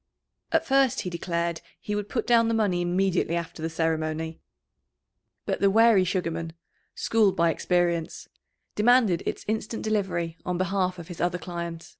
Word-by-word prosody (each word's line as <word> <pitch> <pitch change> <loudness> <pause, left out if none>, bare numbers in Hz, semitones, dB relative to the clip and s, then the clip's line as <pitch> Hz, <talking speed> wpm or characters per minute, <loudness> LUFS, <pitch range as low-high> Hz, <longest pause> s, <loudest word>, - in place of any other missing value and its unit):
At - - +2
first 270 -2 +3
he 180 - -5
declared 170 -1 -2 0.2
he 210 - -5
would 205 0 -3
put 245 - -2
down 230 -1 +4
the 230 - +1
money 200 -5 +1
immediately 175 -1 +1
after 170 -1 -5
the 165 - -2
ceremony. 160 0 -2 1.1
But - - -1
the 200 - +4
wary 220 -2 +5
Sugarman, 165 -3 -2 0.4
schooled 215 -4 +2
by 170 0 +3
experience, 170 -1 -1 0.5
demanded 220 -5 +4
its - - -4
instant 220 +1 -3
delivery 190 -6 -1
on 180 -1 -2
behalf 185 0 0
of 170 -2 -9
his 175 -2 -7
other 175 0 +1
client. 170 -2 -6
180 Hz, 155 wpm, -26 LUFS, 170-210 Hz, 1.1 s, wary